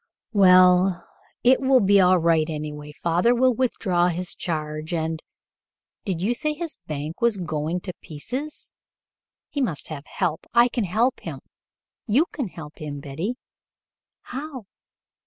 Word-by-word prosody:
"Well, 185 -2 +5 0.4
it 255 +2 +5
will 265 -1 +5
be 200 -2 +5
all 185 0 +5
right, 165 -1 +2
anyway. 150 -1 -5
Father 170 +9 +2
will 255 +1 +4
withdraw 195 -8 +1
his 180 +1 -2
charge 155 0 -3
and 160 0 -2 0.8
did 185 -4 -2
you 225 +5 +2
say 305 +5 -1
his 330 0 -5
bank 155 - -5
was 235 -3 +3
going 160 0 -2
to 180 - -6
pieces? 255 - -5 0.8
He 285 - -2
must 170 - -2
have 150 -2 -7
help. 160 -2 -2
I 240 +1 +6
can 235 -3 -1
help 225 +8 +1
him. - - -7 0.7
You 255 +10 +4
can 270 -8 -3
help 160 -4 -11
him, 145 -2 -5
Betty." 160 - -4 0.9
"How?" 265 -3 -7
180 Hz, 140 wpm, -24 LUFS, 160-240 Hz, 0.9 s, I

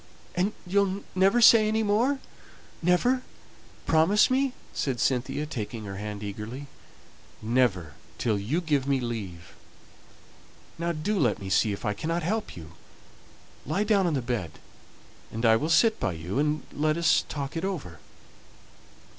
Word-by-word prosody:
"And 190 +4 0
you'll 195 +1 +1
never 195 +6 +3
say 225 -1 +8
any 220 +1 +1
more 230 +7 +2 0.6
never 180 +10 +2 0.6
promise 165 +9 +4
me," 265 0 +2 0.2
said 130 -4 -2
Cynthia, 130 +3 0
taking 115 -5 -5
her 100 -1 -6
hand 105 0 -6
eagerly. 105 +7 -6 0.7
"Never 110 - +1 0.2
till 110 -4 0
you 135 - -1
give 145 -5 0
me 140 -1 +2
leave. 100 -9 -6 1.3
Now 170 0 0
do 180 +6 -1
let - - +2
me 95 -1 -7
see 105 +3 +3
if 100 - -5
I 105 - +1
cannot 165 +8 -2
help 215 - -2
you. 80 -1 -10 0.9
Lie 200 - 0
down 205 -3 +2
on 160 - 0
the 130 - -1
bed, 110 -10 -3 0.8
and 115 +2 -2
I'll 115 +8 +4
sit 220 +6 +4
by 90 - -1
you, 85 +9 -4
and 150 +1 0
let 155 +2 +1
us 170 -1 +3
talk 140 0 -4
it 165 - -3
over." 145 - -4
150 Hz, 145 wpm, -27 LUFS, -, 1.3 s, say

